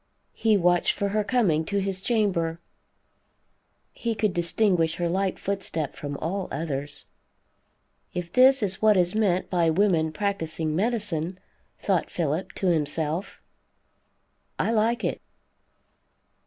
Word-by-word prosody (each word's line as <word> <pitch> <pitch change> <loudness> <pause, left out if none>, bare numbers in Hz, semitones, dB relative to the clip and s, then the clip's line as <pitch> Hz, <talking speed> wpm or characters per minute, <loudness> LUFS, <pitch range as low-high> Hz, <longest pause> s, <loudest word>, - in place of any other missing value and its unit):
He 220 -2 +2
watched 175 -1 +3
for 200 - -1
her 210 +1 0
coming 200 -10 +2
to 200 +4 -2
his 195 -1 -2
chamber; 190 -8 0 1.3
he 230 -1 -3
could 210 -3 0
distinguish 175 -1 +1
her 175 - -1
light 190 +2 0
footstep 185 -7 -3
from 145 -1 -5
all 185 +6 -3
others. 145 -2 -4 1.1
If 175 -1 -5
this 260 0 +6
is 190 -2 -1
what 215 -2 +5
is 180 0 +2
meant 200 -4 +1
by 170 -3 +3
women 165 -3 +2
practicing 160 -3 -2
medicine, 190 -5 -1 0.4
thought 190 -5 0
Philip 170 +3 -2
to - - -4
himself, 160 +2 -1 1.1
I - - 0
like 230 +1 +1
it. - - -2
185 Hz, 125 wpm, -26 LUFS, 165-205 Hz, 1.3 s, this